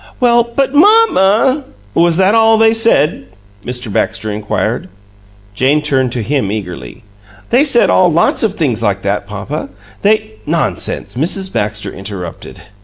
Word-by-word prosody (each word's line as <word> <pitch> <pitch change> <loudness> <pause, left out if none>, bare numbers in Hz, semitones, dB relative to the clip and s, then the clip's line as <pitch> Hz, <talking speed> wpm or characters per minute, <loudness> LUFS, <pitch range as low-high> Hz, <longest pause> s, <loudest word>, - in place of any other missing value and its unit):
"Well, 240 -2 +4
but 275 -1 0
MAMMA 290 - +3 0.2
" 100 0 -30
"Was 170 0 +2
that 190 +2 +3
all 225 0 +4
they 225 0 +4
said?" 190 - +1 0.4
Mr. 125 -4 -5
Baxter 110 +2 -1
inquired. 105 0 -3 0.6
Jane 135 +8 +1
turned 130 -4 +1
to 120 - -3
him 130 -4 -1
eagerly. 90 - -7 0.5
"They 250 +4 +4
said 265 -5 +4
all 180 -2 +3
lots 165 +2 +2
of 215 -3 0
things 125 -9 -1
like 100 -3 -1
that, 100 0 -2
papa. 105 +9 -6 0.3
They 200 - 0
" 105 - -28
"Nonsense!" - - -2
Mrs. 185 +7 0
Baxter 105 0 -3
in - - -11
interrupted. 95 -3 -8
150 Hz, 155 wpm, -14 LUFS, -, 0.6 s, Well